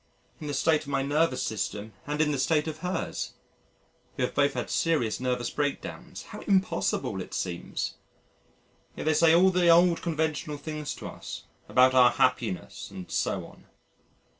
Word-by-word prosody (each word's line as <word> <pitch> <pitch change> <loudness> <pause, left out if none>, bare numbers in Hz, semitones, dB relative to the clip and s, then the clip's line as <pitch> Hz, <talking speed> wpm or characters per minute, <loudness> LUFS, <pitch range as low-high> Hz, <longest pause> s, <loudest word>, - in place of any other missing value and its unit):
In 150 - -6
the 145 - -2
state 155 +3 +3
of - - -12
my 135 -1 0
nervous 145 -1 +1
system 105 +1 -3
and 150 +1 0
in 150 -1 +2
the 140 - -1
state 150 +4 +2
of 155 0 -5
hers 180 0 -3 0.8
we - - 0
have 125 - -1
both 140 0 +2
had 125 - -3
serious 150 -10 +1
nervous 125 -2 -1
break 145 -1 -1
downs - - -9
how - - -9
impossible 190 -2 +1
it - - -7
seems! 85 -1 -3 1.0
Yet - - -5
they 155 - +3
say 165 +1 +5
all 190 +2 +6
the 180 -1 +3
old 170 0 +5
conventional 155 -2 -2
things 150 0 -5
to - - -7
us, - - -8 0.3
about 130 +1 +5
our 125 -1 +7
happiness 120 -9 -1
and 90 - -9
so - - -1
on!... - - -17
150 Hz, 170 wpm, -28 LUFS, 125-160 Hz, 1.0 s, our